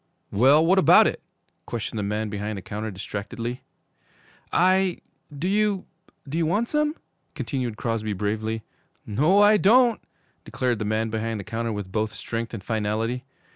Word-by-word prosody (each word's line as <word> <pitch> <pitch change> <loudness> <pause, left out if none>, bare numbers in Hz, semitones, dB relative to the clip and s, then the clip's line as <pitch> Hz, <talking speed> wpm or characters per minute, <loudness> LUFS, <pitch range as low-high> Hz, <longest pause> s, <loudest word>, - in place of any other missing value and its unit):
'Well, 140 +9 +5
what 190 +3 +5
about - - +7
it?' - - -1 0.5
questioned 115 -1 -4
the - - -1
man 105 +2 -2
behind 105 0 -4
the 95 - -7
counter 105 +2 -4
distractedly. 110 +5 -5 0.9
'I 185 +1 +3 0.3
do 150 +5 -3
you 205 -1 +1 0.4
do 155 +5 -2
you 165 - +2
want 210 +8 0
some?' 300 0 +1 0.4
continued 125 -6 -3
Crosby 110 -2 -2
bravely. 110 +3 -2 0.4
'No, 155 - +4
I 210 +1 +6
don't,' 235 +3 +4 0.4
declared 125 -4 -1
the 105 - -2
man 110 +1 0
behind 110 0 -2
the - - -5
counter 115 +3 -3
with 100 -3 -5
both 110 +2 -1
strength 115 0 -4
and 110 -5 -7
finality. 110 +3 -2
115 Hz, 155 wpm, -25 LUFS, 110-170 Hz, 0.9 s, about